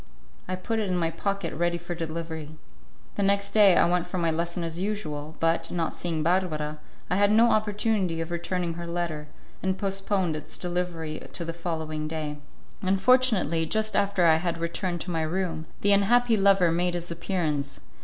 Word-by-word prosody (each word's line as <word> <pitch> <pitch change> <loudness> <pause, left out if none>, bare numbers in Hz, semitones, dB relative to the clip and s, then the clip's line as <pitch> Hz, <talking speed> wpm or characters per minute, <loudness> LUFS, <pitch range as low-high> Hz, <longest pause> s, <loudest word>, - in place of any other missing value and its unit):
I 185 - -1
put 220 +5 -2
it 210 -3 -1
in 180 - +1
my 165 -2 0
pocket 200 -1 -2
ready 175 +2 0
for 175 +1 -5
delivery. 160 -2 -5 0.7
The - - +1
next 200 0 +2
day 200 -3 +6
I - - +5
went 175 0 +1
for 180 - -4
my 165 -2 +1
lesson 170 +2 -2
as 165 0 -3
usual, 160 -7 -3
but, 165 0 +1
not 165 -2 -1
seeing 165 -3 -2
Barbara, 155 -4 0 0.3
I 180 - +3
had 205 +1 +4
no 230 +2 +5
opportunity 210 -5 +1
of 165 +1 -4
returning 175 0 -2
her 170 +1 -6
letter, 170 -3 -3 0.3
and 190 0 0
postponed 195 -3 0
its 155 - -6
delivery 175 -3 -3
to 170 - -4
the 165 - -3
following 160 -2 -3
day. 155 -2 -4 0.4
Unfortunately, 190 - +3
just 215 +4 -1
after 200 -3 +2
I 160 -1 +6
had 170 0 -2
returned 170 +1 -2
to 180 - -4
my 165 -1 0
room, 165 0 -2
the 205 - +3
unhappy 230 +4 +4
lover 195 -4 +4
made 175 +1 +1
his 175 0 -4
appearance. 155 -5 -2
175 Hz, 180 wpm, -27 LUFS, 165-195 Hz, 0.7 s, day